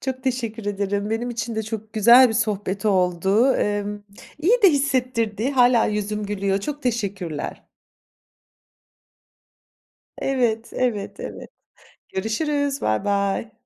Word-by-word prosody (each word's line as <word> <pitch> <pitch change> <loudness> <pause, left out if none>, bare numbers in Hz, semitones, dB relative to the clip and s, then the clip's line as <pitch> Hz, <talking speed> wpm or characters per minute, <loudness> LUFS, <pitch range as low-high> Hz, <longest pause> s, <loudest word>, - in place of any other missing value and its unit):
Çok 260 -1 -4
teşekkür 230 -4 -3
ederim, 205 +1 -2
benim 240 +2 -2
için 235 0 -4
de 220 - -1
çok 220 0 -6
güzel 235 +4 +7
bir 225 - -2
sohbet 210 -2 -1
oldu. 190 +6 +2
Emm, 205 0 -1 0.4
iyi 430 +10 +2
de 385 - +8
hissettirdi, 255 -5 0
hâlâ 245 -3 +4
yüzüm 210 0 -2
gülüyor. 200 -1 -1
Çok 295 +6 -5
teşekkürler. 200 - -3 2.6
Evet, 235 -4 0
evet, 230 -6 -2
evet, - - -8 0.6
görüşürüz. 280 +7 -1
Baybay. 200 - 0
220 Hz, 110 wpm, -22 LUFS, 205-255 Hz, 2.6 s, de